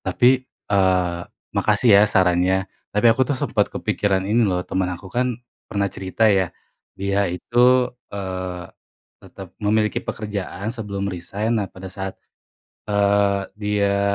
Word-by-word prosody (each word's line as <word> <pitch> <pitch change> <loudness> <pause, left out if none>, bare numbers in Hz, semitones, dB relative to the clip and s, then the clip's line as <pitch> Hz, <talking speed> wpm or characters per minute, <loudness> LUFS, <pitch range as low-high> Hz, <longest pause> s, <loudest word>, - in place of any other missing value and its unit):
Tapi, 110 +7 +4 0.2
eee, 90 -3 +1 0.3
makasih 120 - +2
ya - - +7
sarannya. 95 0 +2 0.2
Tapi 105 +3 0
aku 130 - 0
tuh 140 - +1
sempet - - 0
kepikiran 95 -2 0
ini 110 +4 +2
loh 90 -1 -1
temen 95 -1 -1
aku 90 +1 -8
kan 125 0 0 0.3
pernah 100 -1 0
cerita 95 +3 -1
ya 95 -4 +3 0.5
dia 100 0 0
itu, 125 +7 +3 0.2
eee, 95 -2 -5 0.6
tetap 95 -2 -12
memiliki 105 +1 +1
pekerjaan 105 0 -4
sebelum 100 -4 -4
resain. 100 +4 -2
Nah 105 -5 -1
pada 95 0 -11
saat, 95 -1 -5 0.7
eee, 100 -1 +2 0.2
dia 100 -1 +1
100 Hz, 130 wpm, -22 LUFS, 95-105 Hz, 0.7 s, ya